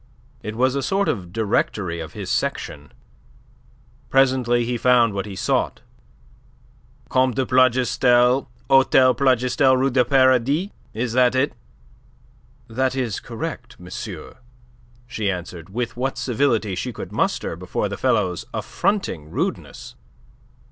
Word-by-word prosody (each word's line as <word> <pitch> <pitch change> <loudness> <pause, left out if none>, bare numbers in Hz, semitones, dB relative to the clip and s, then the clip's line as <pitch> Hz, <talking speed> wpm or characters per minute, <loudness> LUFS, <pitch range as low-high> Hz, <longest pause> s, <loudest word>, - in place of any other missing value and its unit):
It 105 +1 -6
was 130 +2 +2
a 140 - -1
sort 195 +6 0
of 90 -6 -3
directory 100 -4 -1
of 80 - -7
his - - -5
section. 70 -1 -3 1.2
Presently 130 -3 +2
he 120 +1 -2
found 120 -2 +3
what 100 0 -3
he 100 - -7
sought. - - -1 1.3
"Comte 130 -2 +2
de 130 - 0
Plougastel, 125 0 +3 0.2
Hotel 130 -1 +5
Plougastel, 130 0 +3
Rue 135 +1 +1
du 125 0 +3
Paradis. 135 - +2 0.2
Is 115 +1 -2
that 125 0 +3
it?" 130 +3 +1 1.1
"That 130 +3 -1
is 120 -6 -2
correct, 120 0 -7
monsieur," 90 -1 -8 0.7
she 110 -4 -2
answered, 90 -2 -6
with 120 +4 -3
what 130 +2 -2
civility 115 -5 0
she - - -3
could - - -8
muster - - -1
before - - -3
the - - -5
fellow's 90 -2 0
affronting 190 - -2
rudeness. - - -4
125 Hz, 125 wpm, -22 LUFS, 105-130 Hz, 1.3 s, Hotel